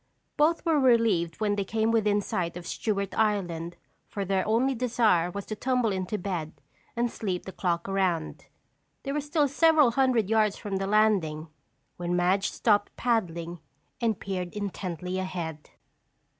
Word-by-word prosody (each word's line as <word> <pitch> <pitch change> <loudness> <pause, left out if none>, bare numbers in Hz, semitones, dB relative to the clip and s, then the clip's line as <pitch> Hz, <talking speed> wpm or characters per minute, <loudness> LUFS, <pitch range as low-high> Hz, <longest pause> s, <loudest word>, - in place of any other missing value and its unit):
Both 325 +4 +2
were 320 -3 +3
relieved 225 - +3
when 210 -2 +1
they 200 - -1
came 220 +3 0
within 210 -2 +2
sight 175 -3 -3
of 175 - -9
Stewart 200 -1 -2
Island 175 -6 -1 0.3
for 200 -1 -4
their 190 0 +1
only 240 +5 +2
desire 225 -8 +2
was 200 +2 -6
to 215 - -5
tumble 250 -1 +1
into 190 +2 -2
bed 175 -5 -4 0.4
and 240 0 0
sleep 185 -5 -3
the 190 - -6
clock 175 -2 -2
around. 185 -5 -1 0.6
They 275 - -3
were 295 +1 -1
still 295 0 +1
several 300 -2 +4
hundred 245 -4 +2
yards 215 -1 +2
from 200 -2 -3
the 195 0 -2
landing 195 -7 +2 0.5
when 175 0 -2
Madge 185 +3 +2
stopped 205 -3 +1
paddling 175 -8 -1 0.4
and 225 -4 0
peered 185 -2 -4
intently 185 -3 -4
ahead. 170 -5 -5
200 Hz, 155 wpm, -27 LUFS, 180-230 Hz, 0.6 s, several